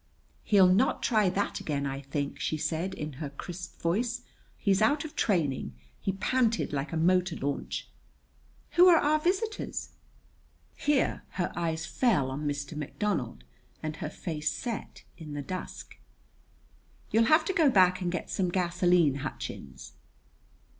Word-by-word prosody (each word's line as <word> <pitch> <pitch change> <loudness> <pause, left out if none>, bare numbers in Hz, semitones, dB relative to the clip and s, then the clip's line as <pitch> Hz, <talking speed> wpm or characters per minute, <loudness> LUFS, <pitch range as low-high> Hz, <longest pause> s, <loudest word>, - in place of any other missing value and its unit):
"He'll 200 -3 +6
not 190 +9 +3
try 215 -5 +3
that 200 +3 -1
again, 140 -2 -2
I 135 0 -3
think," 140 +1 -3
she 155 - -1
said 165 +5 -2
in 150 -1 -5
her 145 - -3
crisp 175 +5 -8
voice. 225 +8 0 0.3
"He's 195 -2 +2
out 290 +7 +3
of 315 0 -9
training. 155 - 0 0.2
He 195 - -1
panted 230 0 +1
like 140 +1 -2
a 165 - -2
motor 180 +1 +3
launch. 140 -1 -3 0.8
Who 355 +1 +7
are 345 -2 +8
our 305 0 +3
visitors?" 390 +7 -1 0.9
Here 290 -2 +1
her 175 - -2
eyes 165 -1 -1
fell 180 - +1
on 145 +3 -3
Mr. 145 +2 -3
McDonald 150 - -2 0.4
and 155 0 -3
her 155 -5 -4
face 155 -1 -3
set 235 -3 -5 0.2
in 155 -2 -8
the 145 - -3
dusk. 185 +5 -7 1.1
"You'll 230 +1 +4
have 310 +6 +5
to 380 - 0
go 320 -6 +5
back 185 -5 +4
and 175 -1 -1
get 180 - -4
some 185 -2 0
gasoline, 175 -4 +3
Hutchins." 135 - -7
180 Hz, 145 wpm, -29 LUFS, 150-225 Hz, 1.1 s, are